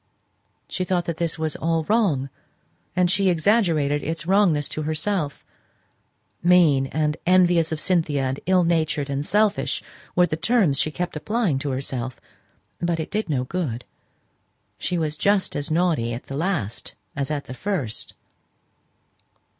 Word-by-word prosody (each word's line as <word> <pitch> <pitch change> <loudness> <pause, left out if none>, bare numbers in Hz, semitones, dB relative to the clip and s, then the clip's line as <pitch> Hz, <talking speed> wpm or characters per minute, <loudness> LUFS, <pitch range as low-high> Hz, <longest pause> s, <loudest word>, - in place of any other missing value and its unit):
She 185 - -2
thought 180 -2 0
that 170 -2 -3
all - - -1
this 165 - -1
was 160 -1 -2
wrong; 165 - +1 0.6
and 180 -1 +3
she 195 -1 +3
exaggerated 165 -6 +2
its 165 +1 -3
wrongness 180 -6 +3
to 155 - -3
herself; 155 0 -2 1.0
"mean," 170 -7 +5
and 150 +2 0
"envious 175 -3 +4
of 160 - -2
Cynthia," 160 -6 +1
and 130 +1 -1
"ill 185 -1 +4
natured," 155 -4 0
and 140 +1 -1
"selfish," 210 +5 +1 0.3
were 180 - +5
the 155 - -2
terms 170 - +2
she - - +2
kept 175 +3 -4
applying 190 - 0
to 140 - -3
herself; 130 -1 -3 0.6
but 170 -1 0
it 160 - -4
did 215 -3 -2
no 130 -4 +1
good, 130 -6 -3 0.9
she 180 - -1
was 155 -2 -1
just 200 +4 +1
as 145 +2 -2
naughty 155 -8 +1
at 120 - -7
the 135 - -6
last 150 - -2 0.2
as 140 0 -2
at 145 -2 -2
the - - -7
first. 140 - -3
160 Hz, 150 wpm, -23 LUFS, 145-180 Hz, 1.0 s, mean